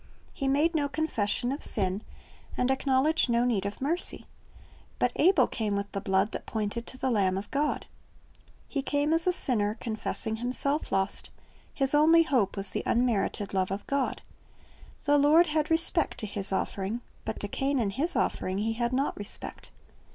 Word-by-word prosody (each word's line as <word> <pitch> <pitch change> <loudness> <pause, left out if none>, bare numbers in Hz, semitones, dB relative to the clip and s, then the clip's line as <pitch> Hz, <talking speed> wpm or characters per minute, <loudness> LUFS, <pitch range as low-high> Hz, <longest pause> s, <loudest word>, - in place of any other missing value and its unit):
He 275 - -3
made 295 +5 +2
no 290 -3 0
confession 245 -6 -1
of 280 - -4
sin, 195 -1 0 0.6
and 250 +1 +1
acknowledged 270 +3 +2
no 235 +1 +2
need 210 -5 0
of 200 - -7
mercy. 325 +7 0 0.7
But - - +1
Abel 365 +2 +5
came 215 -3 -2
with 200 0 -3
the 195 - -4
blood 190 +2 +1
that - - -6
pointed 220 +2 -3
to 260 - -7
the 260 0 -1
Lamb 190 -4 +1
of 200 +1 -7
God. 295 +2 -1 0.8
He 275 - -2
came 290 +2 0
as 330 +2 +5
a - - +5
sinner, 215 - +2
confessing 220 -1 -3
himself 255 +5 -1
lost; 195 +1 +1 0.4
his 270 -1 +2
only 320 +3 +6
hope 245 - 0
was 195 0 -2
the - - -2
unmerited 225 -4 0
love 185 -1 0
of 195 +2 -5
God. 275 -1 -2 0.8
The 290 0 +4
Lord 305 +4 +5
had 305 -2 -1
respect 330 0 +2
to - - -3
his 200 -1 -1
offering, 195 +4 -2 0.2
but - - -5
to - - -3
Cain 275 0 -1
and 210 -5 0
his 325 - 0
offering 185 +1 -1
He 220 +2 -1
had 235 +2 -2
not 270 +3 0
respect. 205 0 -2
245 Hz, 175 wpm, -28 LUFS, 205-290 Hz, 0.8 s, only